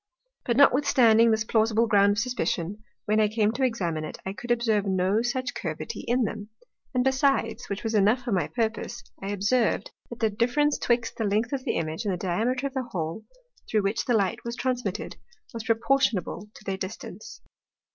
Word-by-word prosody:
But 235 -1 0
notwithstanding 250 -5 +5
this 220 -1 +2
plausible 220 +1 +2
ground 205 -2 +4
of - - -5
suspicion, 210 -4 -2 0.2
when 215 +1 +2
I 215 - +4
came 215 0 +1
to 250 +4 -2
examine 175 -11 -1
it, 155 - -6
I 190 - -3
could 240 +4 -9
observe 230 -4 +2
no 190 +3 +2
such 255 +2 -2
Curvity 155 -2 -5
in 245 +1 +2
them. 210 -1 -4 0.5
And 250 - +3
besides 265 -3 +1
(which 200 0 -4
was 225 -1 -2
enough 215 +4 +3
for 240 - -3
my 180 -7 +1
purpose) 230 -1 -3 0.2
I 195 - -4
observ'd, 205 +1 +1 0.2
that 235 - -8
the 220 -2 +2
difference 250 +7 +1
'twixt 235 -1 0
the 225 - -1
length 215 +5 0
of 265 -2 -3
the - - 0
Image, 160 +6 -3
and 190 -3 0
Diameter 230 +9 0
of 275 - -3
the 265 - -1
Hole, 170 0 -4 0.4
through 215 -2 +2
which 205 +4 0
the 245 - +2
Light 215 +3 0
was 235 0 -4
transmitted, 245 -7 -3 0.4
was 230 -2 -6
proportionable 225 -4 +1
to - - -14
their 195 -2 -3
distance. 190 +3 -7
220 Hz, 185 wpm, -26 LUFS, 200-240 Hz, 0.5 s, notwithstanding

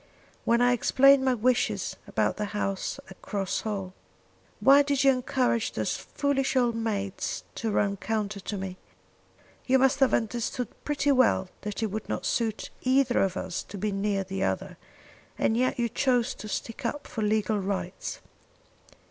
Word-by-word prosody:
"When 235 +1 +3
I 245 0 +5
explained 275 +2 +5
my 260 -1 +3
wishes 245 +2 +1
about - - 0
the 210 - -1
house 195 -2 -2
at 190 - -13
Cross 195 -2 -2
Hall, 195 -4 -4 0.7
why 275 +6 +7
did 280 -1 +1
you 275 - +7
encourage 250 -2 0
those - - -1
foolish 275 -2 -1
old 245 -2 +3
maids 205 -4 -2
to 225 - -3
run 200 -1 +1
counter 210 -1 -2
to 205 +1 -5
me. 190 -1 -5 0.9
You 265 +1 +5
must 270 +2 +3
have 270 -2 +4
understood 235 +2 -2
pretty 290 -1 +1
well 250 -8 +3
that 210 +2 -4
it 215 - -1
would 215 +1 -5
not - - -2
suit 225 -3 -1
either 255 -1 +3
of 190 -1 0
us 185 -2 -3
to 205 - -8
be 210 +2 -1
near 195 0 0
the 190 0 -5
other, - - -2 0.6
and 220 - +2
yet 255 +2 +1
you 240 -1 +1
chose 250 +1 +1
to 215 - -9
stick 230 +5 -5
up 285 +5 -3
for 225 - -5
legal 215 0 +1
rights." 190 -2 -4
225 Hz, 165 wpm, -27 LUFS, 200-255 Hz, 0.9 s, why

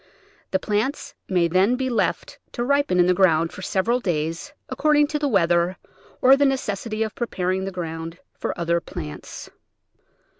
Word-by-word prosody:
The 190 - +2
plants 215 +9 -2 0.2
may 180 -3 +3
then 190 +8 +3
be 260 +1 -2
left 240 -3 -1
to 240 - -2
ripen 280 -7 +2
in 175 - +6
the 180 - +4
ground 165 -3 +3
for - - -9
several 220 +6 0
days, 165 - -2 0.2
accord 300 -1 +2
ing 295 - +5
to 300 -1 -1
the 290 - 0
weather, 175 -4 +2 0.5
or 265 +1 +8
the 285 - +2
necessity 225 -5 -1
of 220 - -4
preparing 190 -5 -2
the 195 - -4
ground 165 -2 -5 0.2
for - - -4
other 170 0 +1
plants. 75 - -8
190 Hz, 165 wpm, -23 LUFS, 170-250 Hz, 0.5 s, or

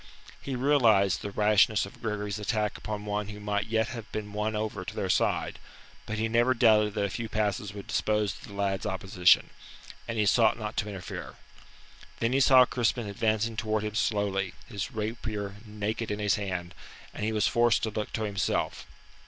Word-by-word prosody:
He 135 - -4
realized 120 -8 +3
the 100 - -4
rashness 105 0 +3
of 100 - -13
Gregory's 105 -2 -3
attack 105 0 -1
upon 105 -1 -5
one 105 0 -2
that 105 0 -8
might 105 0 -1
yet 110 +2 +1
have 115 -3 -8
been 105 -1 -5
won 105 +1 -1
over 105 -3 -3
to - - -7
their - - 0
side; - - 0 0.5
but 110 - -3
he 110 +1 0
never 120 +3 +3
doubted 105 -3 +4
that 105 - 0
a 100 - 0
few 115 +4 -4
passes 105 -2 -1
would 100 - -7
dispose 105 -2 0
of 140 - -12
the 100 - -11
lad's 100 -1 -1
opposition, 95 -1 +3 0.6
and 115 -1 -3
he 105 - +2
sought 110 +2 +4
not 110 -1 -5
to 105 - -1
interfere. 95 -4 -7 0.8
Then 115 +2 0
he 135 - +3
saw 130 -1 +7
Crispin 120 -1 0
advancing 110 +2 0
towards 110 -1 -1
him 105 - -3
slowly, 100 -4 0
his 100 -4 -5
rapier 105 -2 -4
naked 105 +2 -3
in 105 - -2
his 105 -1 +1
hand, 90 -3 -3 0.4
and - - -5
he 110 - 0
was 105 -2 +1
forced 120 -3 +3
to 110 - 0
look 105 0 -4
to 110 - -1
himself. 100 -2 -1
105 Hz, 190 wpm, -28 LUFS, 100-110 Hz, 0.8 s, saw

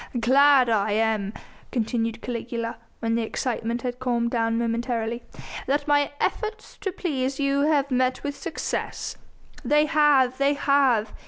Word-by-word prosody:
"Glad 270 +2 +5
am 215 -1 +1
I," - - -10 0.3
continued 230 -1 -1
Caligula, 235 -1 -4 0.2
when 225 0 0
the 230 - +1
excitement 235 +1 -2
had 245 -1 -3
calmed 240 -2 0
down 230 -1 +1
momentarily, 235 0 -1 0.5
"that 285 +2 0
my 290 -1 +3
efforts 435 0 -3
to 390 - -2
please 275 -7 -2
you 275 0 +1
have 285 -2 +1
met 255 0 +1
with 285 -1 -3
success." 325 0 -4 0.5
"They 295 +4 +3
have! 290 -5 +3
They 280 +1 +3
have!" 270 -7 +2
250 Hz, 140 wpm, -25 LUFS, 230-280 Hz, 0.5 s, Glad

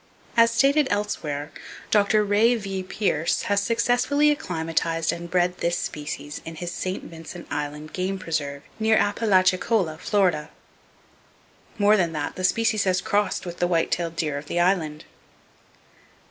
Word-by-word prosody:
As 230 0 +6
stated 275 +5 +3
elsewhere, 155 -8 -2 0.4
Dr. 210 0 +4
Ray 210 +4 +3
V. 195 -4 -4
Pierce 185 -4 0
has 200 0 +1
successfully 245 +7 +2
acclimatized 165 - -1
and 170 0 -7
bred 180 0 +1
this 170 0 0
species 145 0 -5
in 165 - -8
his 175 +2 -5
St. 185 +1 -4
Vincent 165 +1 -10
Island 150 +1 -4
game 190 +1 -2
preserve, 145 -5 -3 0.2
near 220 0 +3
Apalachicola, 190 -4 +2
Florida. 180 -6 +1 1.3
More 210 0 +5
than 170 -4 +1
that, 150 -2 -3
the 185 - -5
species 215 +2 +2
has 185 -1 +2
crossed 205 +2 0
with 175 -1 -6
the 175 - +2
white 170 -2 +1
tailed 170 -1 -1
deer 150 -4 -1
of 145 - -12
the 175 - -1
Island. 170 -4 +1
180 Hz, 145 wpm, -24 LUFS, 160-210 Hz, 1.3 s, As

